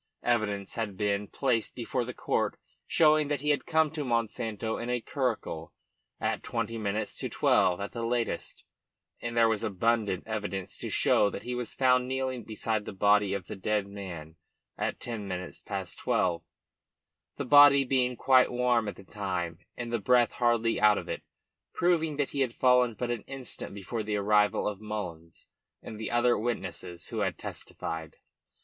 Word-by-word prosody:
Evidence 105 -5 0
had 105 -4 -3
been 105 0 0
placed 125 -3 0
before 125 +1 -2
the 120 - -5
court - - -1 0.3
showing 155 -2 +4
that 145 -2 -1
he 150 0 +2
had 145 - -1
come 160 -2 +3
to 155 -2 -3
Monsanto 115 -2 -1
in 120 - -4
a 125 0 +1
curricle 115 - -3 0.5
at - - -1
twenty 115 - -3
minutes 105 -1 -2
to - - -2
twelve 90 -1 +3
at 100 - -4
the 115 - -4
latest, 115 -6 -2 0.6
and 120 0 -4
there 115 -1 +6
was 110 -2 0
abundant 105 -1 +1
evidence 105 -4 -4
to - - -3
show 105 - +3
that - - -7
he 125 - -4
was 125 -1 -3
found 125 -1 +3
kneeling 130 -2 -2
beside 110 -1 -2
the - - -5
body 100 0 +3
of 95 -3 -5
the - - -6
dead 105 +1 0
man 85 -6 -8 0.4
at - - -2
ten 115 -4 -5
minutes 90 -1 -5
past 95 -3 -5
twelve 85 -2 +1 1.0
the 140 - -3
body 145 0 +8
being 125 -1 +1
quite 130 +1 +4
warm 120 -2 +2
at 100 - -4
the 95 - -13
time 90 -4 -3 0.2
and 120 -1 -5
the 115 - +1
breath 120 +3 +4
hardly 120 -1 +1
out 105 -1 +6
of - - -5
it, - - -3 0.5
proving 160 -4 +2
that 145 -2 0
he 140 - -3
had 125 -3 0
fallen 125 -2 +4
but 120 +1 -2
an 120 -3 -2
instant 135 -2 -6
before 100 +3 -4
the 105 0 -2
arrival 105 +1 +3
of 105 -1 -4
Mullins 90 -7 -6 0.4
and 110 - -8
the 110 - -3
other 120 0 +3
witnesses 95 -7 -4
who - - -3
had - - 0
testified. 80 -2 -6
115 Hz, 175 wpm, -29 LUFS, 100-125 Hz, 1.0 s, body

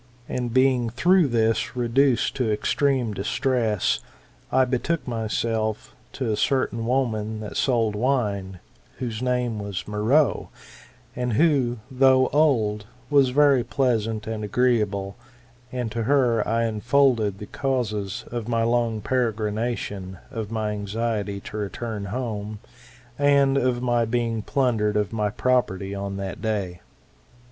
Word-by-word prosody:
And 125 -2 -3
being 130 -1 +3
through 175 +8 +3
this 115 -2 0
reduced 125 +1 +2
to 125 -5 +1
extreme 125 +1 +1
distress, 110 0 0 0.5
I 130 0 +4
betook 130 +6 -1
myself 110 +1 -2 0.2
to 125 -5 -2
a - - +1
certain 115 -2 0
woman 110 -4 -1
that 105 - -7
sold 115 -5 +1
wine, 105 -6 -1 0.4
whose 115 -3 -4
name 125 -3 0
was 100 -3 -5
Meroe, 110 +6 +2 0.7
and 125 -1 -1
who, 135 -4 +2
though 130 0 +4
old, 110 -9 +2 0.2
was 140 -3 +5
very 140 -1 +4
pleasant 115 -6 0
and 110 -1 -4
agreeable: 105 -3 0 0.5
and 125 -3 -3
to 115 - -2
her 120 -3 +2
I 115 +1 +1
unfolded 115 -2 +2
the 105 - -7
causes 110 -5 -2
of 120 -2 -4
my 115 -1 +1
long 115 -2 +1
peregrination, 110 -5 -2
of 110 -5 -4
my 110 -1 -2
anxiety 105 0 -2
to 105 - -7
return 105 0 -4
home, 105 -1 -4 0.6
and 140 -1 +4
of 125 -2 +1
my 120 -2 +2
being 115 -1 -1
plundered 110 -4 +1
of 105 0 -1
my 105 -2 0
property 100 -5 0
on 100 0 -4
that 95 -1 -5
day. 100 -5 -2
115 Hz, 130 wpm, -24 LUFS, 105-130 Hz, 0.7 s, was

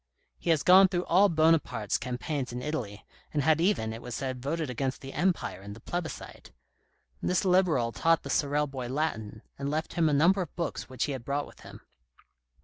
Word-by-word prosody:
He - - -4
has 160 -3 +3
gone 190 +1 +8
through 180 -1 -2
all 195 +4 +5
Buonaparte's 160 - +2
campaigns 125 +2 -3
in 125 +1 -5
Italy, 120 -9 -4 0.3
and 145 -2 0
had 160 +2 +3
even, 170 - +1
it 115 - -8
was 125 -1 -6
said, 130 -2 -4
voted 155 +4 -2
against 130 +2 -3
the 135 -1 -8
Empire 175 - -1
in 100 +1 -8
the 110 - -12
plebiscite. 175 +7 -6 0.7
This 180 +2 +1
Liberal 180 -11 +3
taught 165 +5 +2
the - - -5
Sorel 145 0 +1
boy 135 -3 -6
Latin, 115 -7 -3 0.2
and 140 0 -2
left 155 +2 -2
him 165 -2 +2
a - - +1
number 175 +7 +4
of 170 - -6
books 170 -5 -4
which 130 -1 -2
he 150 - -1
had 130 -3 -5
brought 140 +3 -2
with - - -16
him. - - -12
145 Hz, 200 wpm, -29 LUFS, 125-165 Hz, 0.7 s, gone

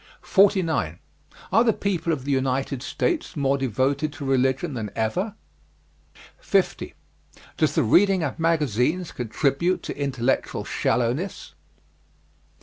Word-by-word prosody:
49. 180 - +2 0.5
Are 225 +4 +5
the 225 -2 +3
people 175 -5 -1
of 135 -5 -3
the 145 - -1
United 135 0 0
States 310 - -2
more 140 -1 +2
devoted 135 +3 0
to 145 - -7
religion 135 +4 +1
than 110 -4 -4
ever? 180 - -1 1.0
50. - - 0 0.6
Does - - +1
the - - +3
reading 190 - +4
of 145 -1 -3
magazines 160 - +1
contribute 140 +9 0
to - - -5
intellectual 135 -3 -1
shallowness? 125 - -1
140 Hz, 115 wpm, -24 LUFS, 130-175 Hz, 1.0 s, Are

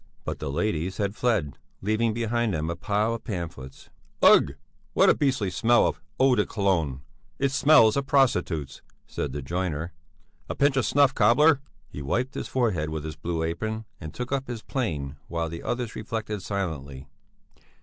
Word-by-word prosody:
But - - -4
the - - -4
ladies 85 +3 -1
had 100 -2 -1
fled, 110 - 0 0.2
leaving 110 +3 +1
behind 115 -2 0
them 80 +1 -2
a - - -3
pile 105 +5 0
of 115 - -6
pamphlets. 85 - -7 0.3
"Ugh! - - +6 0.4
What - - +6
a - - +2
beastly 130 -9 0
smell 120 +4 +4
of - - -2 0.2
eau 135 0 +5
de 105 -4 +3
Cologne! 85 -12 0 0.4
It 140 -1 +1
smells 135 -6 +5
of 140 -1 -1
prostitutes!" 90 - +1 0.2
said 70 - -4
the 70 +1 -5
joiner. 85 +1 -3 0.6
"A - - -3
pinch 140 -1 +3
of 130 -6 +1
snuff, 140 -1 +4
cobbler!" 135 +7 +5 0.3
He 75 - -8
wiped 120 - -1
his - - -4
forehead 105 -12 0
with 80 -1 -4
his 80 -1 -6
blue 80 +1 -3
apron 110 +7 -3
and 80 - -7
took 125 +1 -6
up 135 -1 -1
his 120 -3 -6
plane 75 - -3
while 85 -1 -2
the 85 +1 -7
others 120 -3 -3
reflected 105 -2 -4
silently. 75 -9 -4
105 Hz, 170 wpm, -26 LUFS, 80-120 Hz, 0.6 s, Ugh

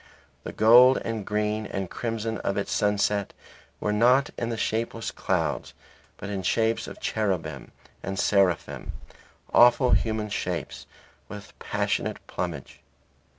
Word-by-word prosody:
The - - -6
gold 125 +4 +7
and 110 -3 -4
green 105 0 -1
and 95 -1 -4
crimson 115 +1 -3
of 100 - -2
its 100 - -2
sunset 105 -1 0 0.5
were 105 - -1
not 125 +6 +4
in 120 - -3
the 115 - -3
shapeless 115 0 -2
clouds - - -2 0.4
but - - -7
in 100 -2 -3
shapes 115 +4 0
of - - -9
cherubim 100 -5 -2 0.3
and 95 +1 -5
seraphim, 95 -5 +1 0.6
awful 120 +1 +6
human 110 -1 +1
shapes 90 -6 -4 0.4
with 105 -1 -9
a - - -33
passionate - - -1
plumage. 85 -6 -5
105 Hz, 130 wpm, -26 LUFS, 100-115 Hz, 0.6 s, gold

